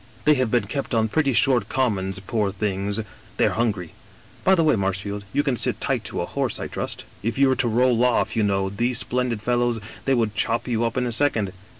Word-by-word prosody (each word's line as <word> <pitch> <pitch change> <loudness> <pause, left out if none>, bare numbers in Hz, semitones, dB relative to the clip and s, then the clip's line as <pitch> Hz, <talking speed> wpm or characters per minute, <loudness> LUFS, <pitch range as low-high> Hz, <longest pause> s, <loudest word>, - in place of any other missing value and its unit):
* - - -25
They 150 - +6
have 130 -4 +1
been 120 -1 +2
kept 135 +3 -3
on 110 -1 +2
pretty 145 +3 +2
short 125 +1 +2
commons, 100 -8 0
poor 100 +1 -1
things! 100 +1 -1 0.4
They - - +3
are - - +3
hungry. 105 -8 -1 0.5
By 190 - +5
the 165 - +2
way, 155 - +4
Marshfield, 100 +1 -2
you 145 - +1
can 135 -4 0
sit - - -1
tight - - -1
to - - -3
a - - -1
horse, - - -2
I - - -3
trust? - - -5 0.2
If 115 +5 -2
you 135 0 +5
were 130 - +3
to 125 - +1
roll 120 +1 +3
off, 125 -1 +2
you 115 - +2
know, 95 -2 +1
these 120 +5 0
splendid 125 -4 -1
fellows 120 0 +1
— - - -18
^they 135 -1 +3
would 110 -3 0
chop 115 +5 0
you 115 -2 0
up 115 +2 -2
in 125 - +1
a 120 - -2
second. 115 -6 +1
115 Hz, 240 wpm, -23 LUFS, 105-125 Hz, 0.5 s, They